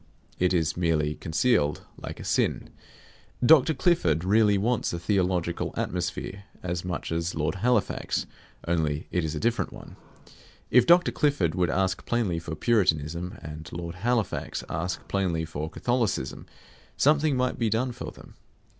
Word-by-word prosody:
It 90 0 +3
is 80 -4 +1
merely 80 -4 +1
concealed, 80 -2 +1
like - - -8
a - - -7
sin. - - 0 0.7
Dr. 155 +1 +6
Clifford 85 - +2
really 105 +1 +4
wants 115 +4 0
a - - -1
theological 90 -2 0
atmosphere 95 +2 -3 0.2
as 90 -1 -2
much 90 -2 -4
as 85 +1 -1
Lord 75 0 0
Halifax; 120 -3 +1 0.4
only 80 -3 0
it 90 - 0
is 80 0 -2
a - - -2
different 120 +5 0
one. - - -12 0.7
If 125 0 +5
Dr. 175 +1 +6
Clifford 140 - +1
would 90 -2 +1
ask 95 +2 0
plainly 110 -8 0
for 80 -1 -6
Puritanism 85 -3 +1
and 75 0 -8
Lord 85 0 -5
Halifax 115 +3 -1
ask 85 +2 -3
plainly 90 -5 0
for 80 -1 -5
Catholicism, 110 - -1 0.5
something 150 -1 +3
might 125 0 0
be 115 -2 +2
done 125 +4 0
for 125 +1 -6
them. - - -15
90 Hz, 145 wpm, -27 LUFS, 80-120 Hz, 0.7 s, Dr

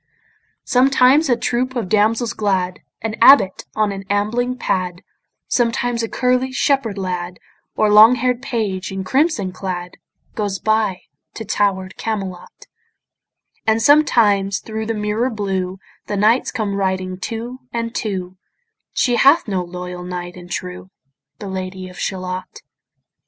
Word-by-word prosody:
Sometimes 265 +3 +4
a 240 - +3
troop 250 +2 -1
of 235 -6 -2
damsels 220 +4 +2
glad, 185 -3 -1 0.2
An 225 -1 -2
abbot 235 -7 +6
on 215 -1 +1
an 195 0 -6
ambling 235 +5 0
pad, 180 -4 -2 0.4
Sometimes 240 0 0
a 225 - -3
curly 255 +1 +1
shepherd 260 -6 0
lad, 180 -2 -4 0.4
Or 215 - +3
long 220 +4 +9
hair'd 250 0 0
page 205 -8 -3
in 190 0 -4
crimson 260 - +1
clad, 180 -1 -5 0.4
Goes 205 -3 -2
by 215 -4 0 0.3
to 225 - -6
tower'd 190 -2 -1
Camelot; 195 -5 -5 1.0
And 220 0 +3
sometimes 220 -8 +4
thro' 220 0 -5
the 225 - -1
mirror 210 +4 0
blue 190 -4 -3 0.3
The 205 - -2
knights 220 +5 +3
come 215 -5 -2
riding 190 -1 -2
two 235 +4 -5
and 230 0 -3
two: 185 -4 -4 0.6
She 245 -1 +2
hath 280 +1 +5
no 190 -3 -1
loyal 180 0 -7
knight 180 0 -6
and 175 -1 -12
true, 90 - -6 0.5
The 205 - -7
Lady 185 0 -5
of 180 - -12
Shalott. 185 -1 -4
210 Hz, 135 wpm, -19 LUFS, 185-235 Hz, 1.0 s, long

